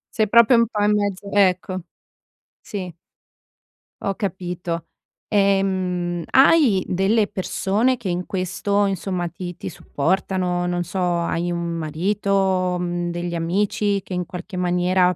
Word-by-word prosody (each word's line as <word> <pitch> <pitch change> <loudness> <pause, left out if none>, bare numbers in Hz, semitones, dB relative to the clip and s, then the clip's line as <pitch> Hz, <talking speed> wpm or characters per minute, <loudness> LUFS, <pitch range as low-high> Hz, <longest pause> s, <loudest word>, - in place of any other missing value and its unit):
Sei 215 -1 +2
proprio 235 +3 +6
un 230 0 +4
po' 210 -2 -3
in 210 0 +4
mezzo 200 -1 -2
ecco, 185 -2 +2 0.8
sì. 185 -5 -6 1.1
Ho 195 -1 -1
capito. 175 -3 -4 0.4
Ehm, 185 -4 +1
hai 265 - +5
delle 200 +4 +2
persone 210 +5 0
che 235 -4 -6
in 180 0 -2
questo, 195 +2 0
insomma, 185 -2 -2
ti-ti 175 +1 -7
supportano? 180 +2 -1
Non 175 0 -1
so, 180 +3 -4 0.2
hai 170 +1 -1
un 170 - -2
marito, 185 +3 0
mhmm, 175 0 -2
degli 175 0 -3
amici, 200 +4 0
che 185 - -8
in 180 0 -2
qualche 180 +4 -8
maniera 180 0 +2
185 Hz, 125 wpm, -22 LUFS, 175-200 Hz, 1.1 s, proprio